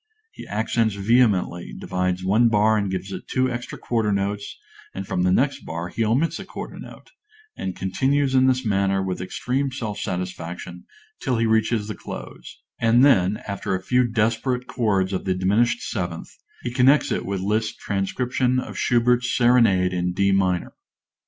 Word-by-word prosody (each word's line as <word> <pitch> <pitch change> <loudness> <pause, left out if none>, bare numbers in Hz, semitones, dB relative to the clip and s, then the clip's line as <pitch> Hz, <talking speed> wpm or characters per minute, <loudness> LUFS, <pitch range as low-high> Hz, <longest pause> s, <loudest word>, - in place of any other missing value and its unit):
He - - -11
accents 110 0 0
vehemently, 100 - +1
divides 90 0 -2
one 110 +5 +4
bar 110 0 +3
and 100 -2 0
gives 95 +1 -4
it - - -7
two 130 0 0
extra 120 0 -5
quarter 115 -3 -1
notes, 100 +1 -2 0.4
and 95 - -4
from 90 - -2
the 90 0 +3
next 135 +9 +2
bar 85 +2 -5
he 115 - -1
omits 125 +10 +1
a - - -6
quarter - - -8
note, - - -12 0.4
and 95 -1 -4
continues 135 +8 0
in 130 0 +5
this 130 -1 +1
manner 95 -2 +1
with 95 -1 -3
extreme 130 +8 -2
self 110 -5 -4
satisfaction 90 -1 -5 0.4
till 125 -3 0
he 115 - +1
reaches 110 -1 +1
the 110 - -4
close; - - -9 0.2
and 115 +3 +5
then, 105 -7 +3
after 100 -1 -2
a 95 - -5
few 125 +4 +2
desperate 115 +3 0
chords 100 -7 0
of 95 - -3
the 95 -1 +1
diminished 110 +6 +1
seventh, 90 -6 -4 0.3
he 120 - -4
connects 130 +4 +4
with 100 -1 -2
it - - -4
Liszt's 110 +2 0
Transcription 125 +6 -1
of - - -6
Schubert's 120 0 +2
Serenade 115 -7 +4
in 90 0 -1
D 100 +2 +2
minor. 95 -2 +1
105 Hz, 170 wpm, -23 LUFS, 95-125 Hz, 0.4 s, in